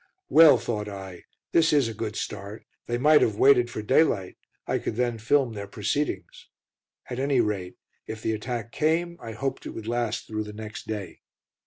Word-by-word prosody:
"Well," 155 -5 +8
thought 110 -2 -3
I, 95 -3 -9 0.3
"this 165 -1 +4
is 145 -5 +3
a 115 - -4
good 110 0 -4
start; 100 +1 -6 0.2
they 120 - -1
might 150 +4 +5
have 110 - +2
waited 125 0 +5
for 110 - -5
daylight, 105 - +2 0.3
I - - 0
could - - -4
then 120 -1 -1
film 125 +2 +2
their 100 -1 -6
proceedings." 110 +9 -3 0.6
At 125 - -3
any 135 -1 +2
rate, 100 -5 -1 0.3
if 110 0 -7
the 110 - 0
attack 115 +1 -4
came, 165 +4 0
I 115 - -7
hoped 135 +4 -4
it - - -8
would 110 -1 -7
last 120 -1 -1
through 110 -1 -4
the 105 - -8
next 110 0 -8
day. 105 -4 -6
115 Hz, 185 wpm, -26 LUFS, 105-130 Hz, 0.6 s, Well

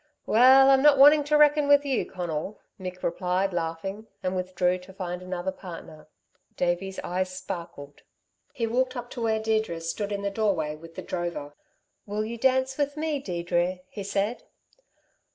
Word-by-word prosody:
"Well, 265 +4 +7
I'm 270 0 +5
not 295 -1 +6
wanting 290 +2 +7
to 300 +1 +3
reck'n 295 -1 +5
with 285 0 +5
you, 270 -4 0
Conal," 175 +2 -4 0.2
Mick 185 -1 -7
replied, 180 +2 0
laughing, 175 +6 -4 0.2
and 185 0 -1
withdrew 180 0 0
to 180 +1 -14
find 180 -2 -5
another 185 0 -3
partner. 165 -5 -11 0.5
Davey's 180 +2 -1
eyes 185 +1 -1
sparkled. 170 -7 -8 0.5
He 235 - -2
walked 255 +3 0
up 245 0 -6
to 245 - -6
where 220 -1 +1
Deirdre 220 -6 -1
stood 185 +5 -4
in 200 0 -3
the 200 - -1
doorway 190 -8 0
with 165 +2 -14
the - - -6
drover. 170 -5 -4 0.5
"Will 210 +1 -2
you 230 +1 -6
dance 260 +2 +1
with 285 +1 -1
me, 310 -2 -1
Deirdre?" 175 -3 -1
he 205 - -6
said. 200 +4 -1
195 Hz, 165 wpm, -26 LUFS, 175-250 Hz, 0.5 s, Well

